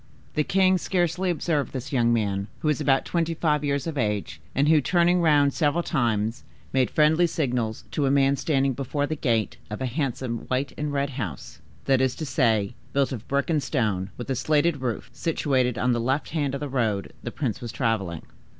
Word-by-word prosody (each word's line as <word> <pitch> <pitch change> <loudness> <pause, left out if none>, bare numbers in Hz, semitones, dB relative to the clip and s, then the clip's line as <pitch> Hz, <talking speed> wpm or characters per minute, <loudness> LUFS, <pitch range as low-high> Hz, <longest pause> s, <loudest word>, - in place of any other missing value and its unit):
The 150 - +1
king 185 +2 +3
scarcely 180 0 0
observed 160 -4 -1
this 130 +1 -5
young 120 -2 +3
man, 100 -3 0
who 155 - +1
was 150 0 0
about 135 -2 +2
twenty 165 -1 -1
five 150 -2 +1
years 140 -1 0
of 160 -4 -3
age, 105 -3 -2
and 140 +3 +3
who, 155 -1 +5
turning 175 +3 +3
round 145 -4 +4
several 160 +2 +1
times, 115 - 0 0.3
made 130 -2 +3
friendly 160 +3 +4
signals 125 -9 -2
to 145 -2 0
a - - +3
man 135 0 +4
standing 135 -1 +1
before 140 +3 -2
the 155 - -3
gate 115 -7 0
of 105 - -5
a 130 - -2
handsome 125 -3 -2
white 130 +2 -1
and 150 -1 -3
red 140 0 -1
house; 100 - -6 0.2
that 135 -1 +3
is 130 -1 +1
to 160 - -4
say, 115 -7 +1 0.2
built 140 -1 +2
of 120 -4 -6
brick 140 0 0
and 155 -2 +2
stone, 105 -10 -1
with 120 - -6
a - - +1
slated 150 +2 +1
roof, 120 -5 -3
situated 130 -7 0
on 125 - +1
the 120 - 0
left 135 +5 -1
hand 145 -4 -1
of 140 - -5
the 145 - -2
road 115 -7 -1
the - - -4
prince 125 -2 -3
was 120 -2 -5
traveling. 105 - -1
135 Hz, 205 wpm, -25 LUFS, 120-150 Hz, 0.3 s, who